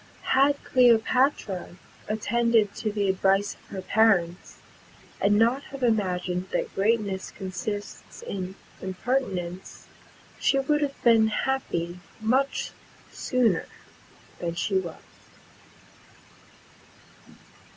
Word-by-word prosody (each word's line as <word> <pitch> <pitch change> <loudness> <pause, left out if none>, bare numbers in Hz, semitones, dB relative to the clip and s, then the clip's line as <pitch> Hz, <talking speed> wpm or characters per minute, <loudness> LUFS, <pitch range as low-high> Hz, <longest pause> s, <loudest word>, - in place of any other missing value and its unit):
Had 275 +2 +5
Cleopatra 245 -6 +2 0.3
attended 220 0 +2
to 215 - -3
the 205 -1 0
advice 195 +1 +2
of - - -24
her 190 - -5
parents, 190 -6 +2 0.6
and 205 +1 +3
not 235 +5 +2
have 275 -1 -8
imagined 185 -5 0
that - - -2
greatness 200 -2 0
consists 195 +2 -6
in 190 -1 -5 0.3
impertinence, 190 -3 -3 0.5
she 275 - +3
would 295 +2 +1
have 280 -2 -2
been 225 -2 +6
happy 195 -8 -2 0.2
much 260 +5 0 0.4
sooner 235 -9 +1 0.7
than 170 -1 -3
she 190 +2 +1
was. 170 -3 -8
210 Hz, 95 wpm, -26 LUFS, 190-240 Hz, 0.7 s, been